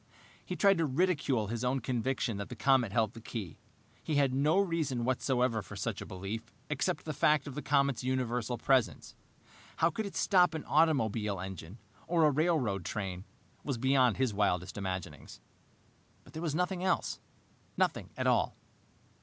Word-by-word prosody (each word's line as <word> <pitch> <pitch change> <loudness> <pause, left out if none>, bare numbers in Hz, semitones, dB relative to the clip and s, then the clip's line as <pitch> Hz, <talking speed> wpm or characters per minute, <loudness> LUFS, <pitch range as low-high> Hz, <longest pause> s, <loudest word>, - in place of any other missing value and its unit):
He - - -5
tried 195 -3 +4
to 165 - +2
ridicule 145 - +1
his 115 +3 -4
own 130 +2 +1
conviction 120 -2 -1
that 100 - -5
the - - -6
comet 130 -6 +3
held 110 0 +1
the 115 - -10
key. 110 -6 -6 0.4
He 155 - -2
had 140 -2 +3
no 150 +6 +2
reason 160 -10 0
whatever 125 -2 +1
for 95 - -10
such - - -3
a - - -7
belief, 100 +4 -6 0.2
except 150 +3 -1
the 155 - -3
fact 150 +1 +3
of 140 - -6
the 150 - -4
comet's 140 -4 +1
universal 125 -2 -1
presence. 130 -3 +1 0.6
How 165 - +4
it - - -11
could 205 0 -4
stop 180 -4 +4
an 160 - -5
automobile 115 - +2
engine 95 +1 -7 0.3
or 165 -2 +3
a 150 - +5
railroad 140 - +1
train 95 -1 -4 0.4
was 140 -4 -2
beyond 130 -2 +3
his 130 -4 +1
wildest 95 -3 0
imaginings. 95 -3 -5 0.8
But - - -18
there 160 - -5
was 160 -3 -2
nothing 180 +1 -1
else. 190 - 0 0.6
Nothing - - 0
at - - -2
all. - - +2
130 Hz, 170 wpm, -31 LUFS, 110-155 Hz, 0.8 s, a